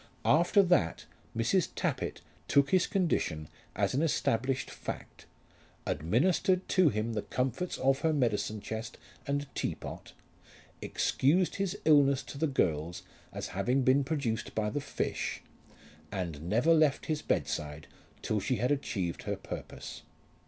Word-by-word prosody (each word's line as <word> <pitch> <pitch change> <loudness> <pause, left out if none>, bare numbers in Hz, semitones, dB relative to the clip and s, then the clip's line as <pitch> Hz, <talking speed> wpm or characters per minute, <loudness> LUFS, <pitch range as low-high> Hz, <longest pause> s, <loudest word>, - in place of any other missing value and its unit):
After 175 +6 +5
that 175 - +2 0.3
Mrs. 130 +11 +2
Tappitt - - -2 0.3
took 140 -1 +3
his 185 -1 +4
condition 90 - 0 0.3
as - - +1
an 135 - +1
established 130 -4 0
fact, - - -7 0.6
administered 175 - +2
to 185 -5 +5
him 110 0 -2
the 105 - -1
comforts 130 - -2
of 135 +1 +2
her 160 - +2
medicine 110 -6 0
chest 110 +2 -5 0.3
and 145 0 0
teapot, - - -5 0.7
excused 170 +7 +2
his 195 0 -1
illness 140 -3 +5
to 140 - -9
the 160 - +2
girls 85 - 0 0.3
as - - -5
having 125 +8 +1
been 130 +2 +4
produced 130 -6 -2
by 105 -1 0
the 145 - -2
fish, 140 - -2 0.7
and 85 -4 -4
never 120 - +4
left 155 -3 +3
his 155 -1 -1
bedside 75 0 -2 0.4
till 110 - 0
she 125 +6 0
had 125 +4 0
achieved 100 -11 -1
her - - -2
purpose. - - -8
135 Hz, 135 wpm, -31 LUFS, 110-155 Hz, 0.7 s, After